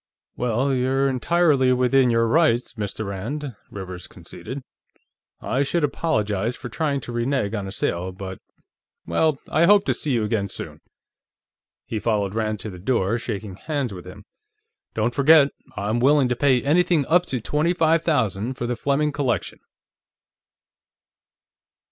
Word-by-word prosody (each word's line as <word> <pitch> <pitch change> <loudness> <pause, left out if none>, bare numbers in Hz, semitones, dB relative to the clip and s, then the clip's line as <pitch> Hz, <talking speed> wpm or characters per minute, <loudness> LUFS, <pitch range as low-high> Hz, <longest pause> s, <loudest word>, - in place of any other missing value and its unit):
"Well, 125 +3 0
you're 135 +2 +1
entirely 135 0 +2
within 125 +1 +3
your 115 0 +2
rights, 125 -4 +2
Mr. 110 -1 -4
Rand," 120 +8 -5
Rivers 90 -2 -7
conceded. 135 +1 -9 0.8
"I 130 - -1
should 155 +4 0
apologize 110 - 0
for 125 - -8
trying 140 +1 -1
to - - -7
renege 120 -2 -1
on 100 -3 -3
a - - -6
sale, 90 -1 -2
but.... 95 0 -8 0.7
Well, 140 - +1
I 165 - +3
hope 205 +2 +5
to - - +2
see 145 - -2
you 115 -3 +1
again, 105 -2 -1
soon." - - -8 1.0
He 110 - -3
followed 105 -3 0
Rand 110 -1 -1
to 110 - -6
the 90 - -10
door, 115 +1 0
shaking 105 -4 -5
hands 140 -2 -3
with 90 -1 -9
him. 105 +2 -11 0.7
"Don't 110 +2 0
forget; 145 +1 +6 0.3
I'm 110 +4 -1
willing 135 0 +4
to 125 - +1
pay 130 -2 +2
anything 165 0 +3
up 175 +4 +3
to 130 - -2
twenty 150 +9 0
five 165 -1 +3
thousand 125 - 0
for 120 - -4
the 120 0 -1
Fleming 140 +4 0
collection." 130 - -2
125 Hz, 150 wpm, -23 LUFS, 105-145 Hz, 1.0 s, forget